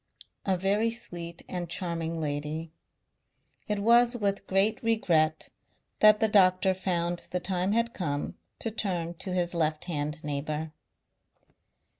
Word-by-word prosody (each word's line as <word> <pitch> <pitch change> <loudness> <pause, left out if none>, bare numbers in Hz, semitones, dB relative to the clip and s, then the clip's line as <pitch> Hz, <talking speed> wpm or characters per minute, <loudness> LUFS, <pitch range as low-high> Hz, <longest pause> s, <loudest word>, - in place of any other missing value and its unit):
A 190 -1 +2
very 200 +5 +2
sweet 170 -7 -6
and 175 -2 -4
charming 165 -2 -3
lady. 150 +2 -3 1.0
It 210 -2 0
was 235 +3 +4
with 200 -3 -1
great 195 +3 +2
regret 165 -9 +1 0.5
that 215 0 +7
the 220 - +4
doctor 190 -2 +4
found 175 -2 -1
the 180 - -1
time 185 +2 0
had 235 +1 +1
come 145 -6 -2 0.2
to 225 - -3
turn 180 -6 -2
to 190 - -4
his 180 -1 0
left 155 -2 0
hand 150 -2 -3
neighbour. 150 +2 -3
180 Hz, 130 wpm, -28 LUFS, 160-205 Hz, 1.0 s, that